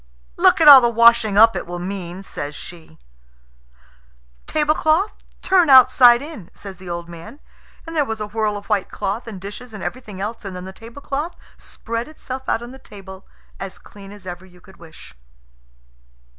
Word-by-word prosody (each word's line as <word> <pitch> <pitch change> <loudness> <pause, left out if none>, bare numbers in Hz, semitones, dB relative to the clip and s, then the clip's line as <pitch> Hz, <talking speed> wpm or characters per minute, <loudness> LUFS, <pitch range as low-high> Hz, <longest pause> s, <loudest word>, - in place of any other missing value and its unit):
"Look - - +4
at 320 - +4
all 275 -3 +11
the 240 - +2
washing 235 -2 +4
up 225 +1 +6
it - - -5
will 175 0 -6
mean," 180 0 -6
says 145 -5 -7
she. 160 - -12 1.5
"Tablecloth, 310 +5 +1 0.3
turn 365 -4 +3
outside 255 -1 +7
in!" 290 - -10
says 195 -2 -9
the 185 -1 -11
old 170 0 -5
man; 170 - -12 0.5
and 330 0 -8
there 300 - +2
was 225 -5 -5
a 210 - -3
whirl 210 0 -2
of 200 - -10
white 205 -3 -1
cloth 205 +4 -4
and 210 -4 -8
dishes 210 +4 -9
and 200 - -8
everything 215 -7 -7
else, 215 +4 -5
and 195 -2 -7
then 180 0 -8
the 190 - -9
tablecloth 280 - -6 0.2
spread 230 +1 -6
itself 265 -4 -8
out 230 - -1
on 240 - -9
the 265 - -13
table 195 -5 -13 0.3
as 195 -1 -7
clean 200 -1 -14
as 205 -2 -14
ever 180 0 -8
you 180 -1 -19
could 190 +1 -19
wish. 165 -2 -15
215 Hz, 180 wpm, -20 LUFS, 190-255 Hz, 1.5 s, all